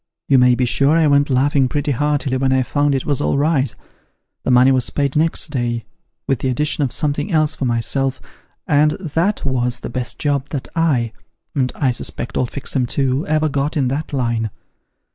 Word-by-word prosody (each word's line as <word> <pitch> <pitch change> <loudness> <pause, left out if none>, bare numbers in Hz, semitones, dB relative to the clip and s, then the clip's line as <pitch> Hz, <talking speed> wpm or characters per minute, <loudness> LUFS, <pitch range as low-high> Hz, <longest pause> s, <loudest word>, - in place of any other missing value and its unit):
You 135 -2 +5
may 125 0 +5
be 125 - +1
sure 140 +6 +3
I 165 - +3
went 140 0 +3
laughing 135 +1 +2
pretty 145 +1 -1
hearty 145 0 0
when 130 0 +1
I 130 0 +2
found 145 +2 +1
it 135 - -2
was 145 -1 0
all 140 - +1
right. 140 -4 +1 0.7
The - - -3
money 125 +1 +5
was 130 -2 +1
paid 140 -2 -1
next 160 0 +2
day, 120 -4 -2 0.4
with 135 -4 0
the - - -2
addition 150 +4 +1
of 130 - -1
something 145 +4 -1
else 155 -2 +3
for 140 - -3
myself, 130 +3 0 0.5
and 150 +1 +3
that 170 +3 -1
was 125 -2 -1
the - - -6
best 125 0 -3
job 145 -1 -1
that 140 -3 -4
I 135 -9 +1 0.4
(and 130 -3 0
I 135 -4 +1
suspect 120 0 -4
old 125 - 0
Fixem 130 -2 -2
too) 135 +2 -1
ever 155 0 +1
got 145 +2 -1
in 135 -3 +1
that 145 +4 -3
line. 120 -5 -1
140 Hz, 195 wpm, -19 LUFS, 125-150 Hz, 0.7 s, You